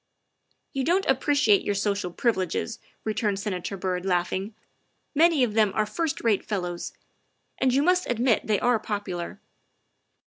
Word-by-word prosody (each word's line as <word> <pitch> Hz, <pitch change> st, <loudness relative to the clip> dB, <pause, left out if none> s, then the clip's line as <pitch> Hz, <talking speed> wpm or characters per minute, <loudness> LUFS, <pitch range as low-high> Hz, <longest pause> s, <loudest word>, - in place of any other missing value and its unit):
" -, -, -46 dB
You 270 Hz, -, -1 dB
don't 360 Hz, +7 st, +2 dB
appreciate 270 Hz, -5 st, +3 dB
your 205 Hz, -, -1 dB
social 200 Hz, -2 st, -1 dB
privileges," 190 Hz, +1 st, -1 dB, 0.2 s
re 215 Hz, -, -1 dB
turned 210 Hz, -2 st, 0 dB
Senator 195 Hz, -1 st, -3 dB
Byrd, 180 Hz, -1 st, -2 dB
laughing; 190 Hz, +3 st, -1 dB, 0.3 s
" -, -, -47 dB
many 320 Hz, -2 st, +4 dB
of 230 Hz, -4 st, 0 dB
them 215 Hz, -2 st, +3 dB
are 215 Hz, -, +2 dB
first 320 Hz, +7 st, -2 dB
rate 220 Hz, -4 st, +2 dB
fellows. 180 Hz, -4 st, -4 dB, 0.7 s
And 260 Hz, -1 st, +3 dB
you 275 Hz, +3 st, +3 dB
must 360 Hz, +2 st, +2 dB
admit 240 Hz, -1 st, +1 dB
they 210 Hz, -2 st, +2 dB
are 245 Hz, -2 st, +2 dB
popu 205 Hz, -4 st, -4 dB
lar." 175 Hz, +3 st, -6 dB
215 Hz, 165 wpm, -26 LUFS, 195-260 Hz, 0.7 s, many